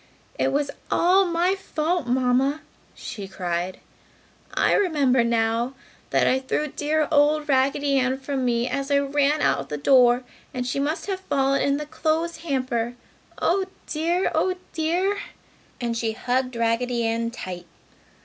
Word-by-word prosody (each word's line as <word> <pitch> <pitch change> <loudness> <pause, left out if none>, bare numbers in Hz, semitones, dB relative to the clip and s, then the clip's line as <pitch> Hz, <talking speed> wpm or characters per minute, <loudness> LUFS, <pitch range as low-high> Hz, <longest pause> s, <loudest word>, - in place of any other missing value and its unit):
"It 265 - +2
was 285 +1 0 0.2
all 375 +3 +4
my 350 +1 +1
fault, 340 -5 -2
Mamma!" 260 +4 +2 0.3
she 210 -6 -7
cried. 180 -1 -3 0.7
"I - - +2
remember 285 - +3
now 235 +2 0 0.3
that - - +2
I 260 - +3
threw 280 +3 -2
dear 300 +2 0
old 300 0 +3
Raggedy 275 0 +2
Ann 255 +1 +1
from 270 0 -3
me 240 -1 +1
as 275 +2 -2
I 285 - +4
ran 285 +1 +1
out 140 0 +1
the 150 - -3
door 245 - +5 0.3
and 250 -1 -2
she 255 +2 -2
must 300 +5 -1
have 385 -2 -3
fallen 275 -6 +1
in 280 0 +2
the 300 - -4
clothes 320 +2 -1
hamper! 255 -7 -2 0.4
Oh 380 +3 +2 0.2
dear! 335 +4 0
Oh 370 -1 +1 0.2
dear!" 355 +5 0 0.6
and 235 -1 -2
she 225 -1 -1
hugged 250 +2 -1
Raggedy 235 +1 0
Ann 230 +1 0
tight. 185 -7 -7
275 Hz, 150 wpm, -24 LUFS, 240-310 Hz, 0.7 s, door